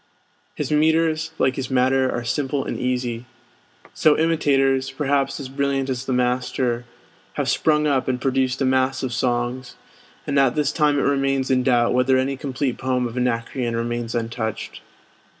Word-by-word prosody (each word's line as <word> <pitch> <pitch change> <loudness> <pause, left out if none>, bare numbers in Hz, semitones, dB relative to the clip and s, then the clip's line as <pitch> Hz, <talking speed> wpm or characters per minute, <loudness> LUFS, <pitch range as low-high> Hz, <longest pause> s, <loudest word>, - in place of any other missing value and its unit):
His - - -3
metres, 160 +1 +2
like 130 0 +1
his 130 -2 -3
matter, 130 0 +2
are 120 - -3
simple 135 +3 -1
and - - -4
easy. 125 -2 -2 0.7
So 155 -1 +3
imitators, 135 -5 +2
perhaps 140 0 -1
as 140 - -6
brilliant 135 0 -1
as 130 0 -4
the 135 - -3
master, 125 -1 0 0.5
have - - -2
sprung 150 -1 +2
up 140 -3 +1
and 130 -1 0
produced 130 0 0
a - - +2
mass 130 0 +1
of 130 -2 -2
songs; 120 +1 -2 0.5
and 140 -1 +1
at 135 -3 +3
this 150 -1 +1
time 150 -2 +2
it 140 - +1
remains 135 -1 +1
in 130 -1 +3
doubt 120 -2 +2
whether 130 +1 +3
any 135 +1 0
complete 130 -1 -3
poem 125 -1 0
of 115 - -9
Anacreon 120 0 -1
remains 120 0 -3
untouched. 115 -2 -4
130 Hz, 165 wpm, -22 LUFS, 125-140 Hz, 0.7 s, So